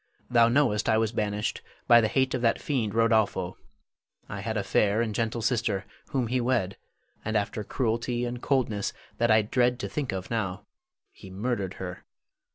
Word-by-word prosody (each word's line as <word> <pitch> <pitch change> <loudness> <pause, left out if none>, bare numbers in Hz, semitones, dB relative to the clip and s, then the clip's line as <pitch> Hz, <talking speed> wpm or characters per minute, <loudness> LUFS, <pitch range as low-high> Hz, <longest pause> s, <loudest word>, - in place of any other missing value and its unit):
Thou 115 -1 +6
knowest 120 -5 +2
I 110 - +4
was 110 -1 +1
banished 105 -2 -2 0.3
by 120 0 +8
the 110 - +2
hate 130 +3 +1
of 125 - -1
that 115 -1 +2
fiend 115 -8 -1
Rodolpho. 110 -5 +2 0.7
I 100 - -6
had 110 +2 -2
a 100 - 0
fair 105 +2 +2
and 115 -2 0
gentle 115 +1 -1
sister, 110 -5 0 0.2
whom 130 -3 0
he 125 +2 0
wed, 120 -6 0 0.5
and 110 0 0
after 105 +1 -2
cruelty 120 +1 -1
and 120 0 -4
coldness 115 -7 0 0.3
that 120 +1 +3
I 110 0 +5
dread 125 +3 +2
to - - -2
think 145 -4 -3
of 95 +2 -5
now, 105 -3 -2 0.5
he 95 - -13
murdered 100 -1 -2
her. 90 -1 -7
110 Hz, 175 wpm, -27 LUFS, 105-120 Hz, 0.7 s, by